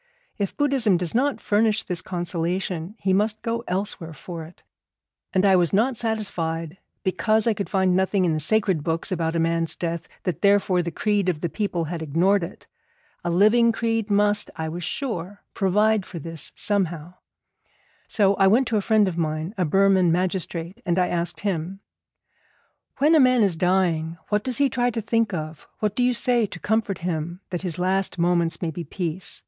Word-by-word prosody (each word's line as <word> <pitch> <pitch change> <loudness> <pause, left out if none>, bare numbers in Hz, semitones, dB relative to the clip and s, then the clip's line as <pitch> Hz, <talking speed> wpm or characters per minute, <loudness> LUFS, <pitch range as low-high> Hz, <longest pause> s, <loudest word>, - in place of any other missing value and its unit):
If 200 -2 -2
Buddhism 265 -10 +2
does 175 -1 -3
not 270 +4 +1
furnish 215 +1 +1
this 180 -3 -3
consolation, 175 +1 -3
he 190 -3 0
must 210 +2 0
go 230 0 -2
elsewhere 180 -3 -3
for 165 +2 -8
it. 165 - -17 0.7
And 190 +1 +2
I 195 -1 +6
was 175 -3 +2
not 235 +6 +2
satisfied, 180 -7 -2 0.2
because 205 +4 +1
I 230 - +3
could 200 -1 -4
find 190 -2 +2
nothing 190 0 +2
in 165 - +1
the 155 - -1
sacred 190 -1 +1
books 165 +5 0
about 165 -2 -1
a - - +1
man's 165 0 0
death, 170 -1 -4 0.2
that 180 -6 -3
therefore 200 -2 +3
the 170 - -3
creed 205 +1 0
of 160 -4 -2
the 170 - -1
people 200 -5 -2
had 165 +1 -5
ignored 170 +6 +2
it. 170 - -8 0.6
A - - -1
living 215 +7 +4
creed 225 -1 -1
must, 205 0 +2
I 160 - -3
was 175 +2 -5
sure, 205 - -4
provide 210 +2 +2
for 180 - -9
this 165 0 -5
somehow. 175 -5 -1 0.9
So 200 -2 +3
I 195 - +5
went 240 +6 +4
to 225 - +1
a - - +1
friend 215 -1 +3
of 175 -2 -3
mine, 155 +3 -2
a 185 - 0
Burman 190 +1 +4
magistrate, 180 +2 -2
and 175 -1 0
I 180 -1 +2
asked 175 0 -2
him: 190 -1 -3 1.2
'When 295 +4 +4
a 320 - +6
man 255 -3 +5
is 195 -5 +1
dying, 170 -2 +1
what 210 0 +1
does 255 -3 +2
he 285 - +4
try 245 -1 0
to 225 -1 -3
think 225 +1 +1
of? 155 -3 -6
What 210 -1 -1
do 250 - 0
you 245 0 +3
say 235 -1 +2
to 180 - -9
comfort 215 -2 0
him 170 +1 -3
that 175 - -2
his 175 -3 -3
last 190 +2 0
moments 170 0 +1
may 165 - -1
be 170 +2 -6
peace? 175 +2 -4
190 Hz, 190 wpm, -24 LUFS, 170-210 Hz, 1.2 s, I